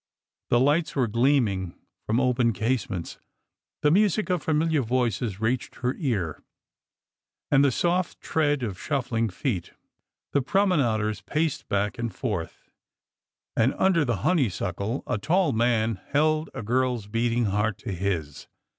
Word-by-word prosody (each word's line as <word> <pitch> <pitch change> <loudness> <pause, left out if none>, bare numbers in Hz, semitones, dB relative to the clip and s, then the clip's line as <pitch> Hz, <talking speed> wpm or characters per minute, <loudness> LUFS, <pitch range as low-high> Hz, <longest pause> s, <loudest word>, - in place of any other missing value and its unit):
The 120 - +4
lights 150 +6 +2
were 130 -3 +2
gleaming 115 -6 +1 0.3
from 110 +3 +2
open 125 -3 +2
casements, 105 -5 -2 0.6
the 150 - +5
music 205 +2 +2
of 180 -3 +1
familiar 160 -1 +1
voices 120 -4 -1
reached 115 +3 -1
her 125 0 -1
ear, 100 - -2 1.1
and 140 -1 +5
the 140 - +4
soft 175 +6 0
tread 145 -4 0
of 100 -5 -4
shuffling 125 -6 -1
feet; 95 -1 -3 0.6
the 140 - +3
promenaders 130 - +1
paced 155 -1 -2
back 100 +2 -1
and 115 -1 -2
forth; 105 -11 -5 0.8
and 120 +4 +2
under 185 -4 +3
the 120 -6 0
honeysuckle 110 - 0
a 105 - -1
tall 170 - +2
man 115 -2 +1
held 155 +2 +1
a - - -5
girl's 125 0 0
beating 115 +2 0
heart 105 +1 0
to - - -6
his. 85 -6 -3
120 Hz, 135 wpm, -26 LUFS, 105-145 Hz, 1.1 s, the